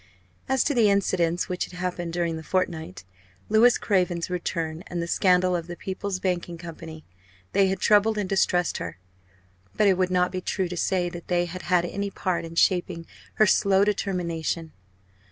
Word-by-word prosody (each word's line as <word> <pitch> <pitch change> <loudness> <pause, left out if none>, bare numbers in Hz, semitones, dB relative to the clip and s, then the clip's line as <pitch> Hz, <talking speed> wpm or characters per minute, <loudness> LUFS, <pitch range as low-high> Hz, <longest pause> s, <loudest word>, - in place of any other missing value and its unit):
As 265 -1 +3
to 290 - 0
the 230 -5 +4
incidents 180 -3 +1
which 180 0 -2
had - - -15
happened 180 -1 -3
during 170 -1 -1
the 160 - -6
fortnight 175 0 -2 0.5
Louis 230 +3 +5
Craven's 180 -4 0
return, 165 -2 -3
and 175 - -4
the 170 - -1
scandal 180 +1 +3
of 170 -1 -3
the 175 - -6
"People's 190 +1 -4
Banking 175 -2 -2
Company" 160 -2 -9 0.5
they 195 -1 +3
had 190 0 -1
troubled 210 +2 +3
and 205 -2 -1
distressed 180 -2 +1
her; 85 0 -6 0.8
but 210 - +3
it 190 -2 +3
would 185 -1 +2
not 180 0 +2
be 185 - -3
true 190 0 -1
to 180 - -5
say 180 0 0
that 175 0 -9
they 175 -1 +1
had 180 +1 -7
had 175 -1 +2
any 200 +3 -3
part 185 -3 -2
in 165 0 -9
shaping 175 -1 +1 0.3
her 215 - +5
slow 195 -1 +4
determination. 170 -5 -2
180 Hz, 180 wpm, -25 LUFS, 170-190 Hz, 0.8 s, Louis